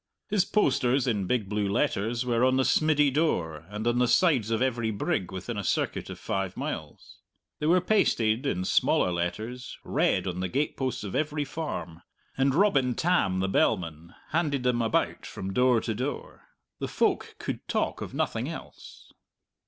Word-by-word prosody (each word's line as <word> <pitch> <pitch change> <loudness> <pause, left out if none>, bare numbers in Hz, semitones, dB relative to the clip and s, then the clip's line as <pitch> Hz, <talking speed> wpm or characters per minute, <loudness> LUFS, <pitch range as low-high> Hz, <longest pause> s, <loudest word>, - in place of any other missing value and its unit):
His 200 -3 +3
posters, 135 - +2
in 105 -7 0
big 115 -3 0
blue 105 0 -1
letters, 115 +4 0
were 120 -1 +1
on 130 0 +4
the 130 - +3
smiddy 150 -2 +3
door 85 - 0
and 105 +2 -5
on 120 +1 +2
the 125 - +3
sides 130 - +3
of 115 -1 +1
every 120 -3 0
brig 100 -3 -1
within 95 +4 -5
a - - -3
circuit - - -1
of - - -7
five 95 -2 -3
miles; - - -6 0.4
they 150 - -1
were 180 +2 +5
pasted, 130 - +2
in 90 -7 -1
smaller 90 - +2
letters, 110 +9 -4
red - - +1
on 90 -1 -3
the 95 - -1
gateposts 135 -3 -1
of 100 - -5
every 150 -1 -1
farm; 110 - -5 0.3
and 135 0 +2
Robin 140 - +3
Tam, 155 - +1
the 95 - +1
bellman, 85 -4 0
handed 145 -5 0
them 125 -1 +2
about 115 - 0
from 95 0 -6
door 125 0 +4
to 115 - -2
door. 130 +7 -5 0.3
The - - -2
folk - - 0
could - - -5
talk - - -1
of - - -6
nothing - - -1
else. - - -10
120 Hz, 170 wpm, -27 LUFS, 95-140 Hz, 0.4 s, were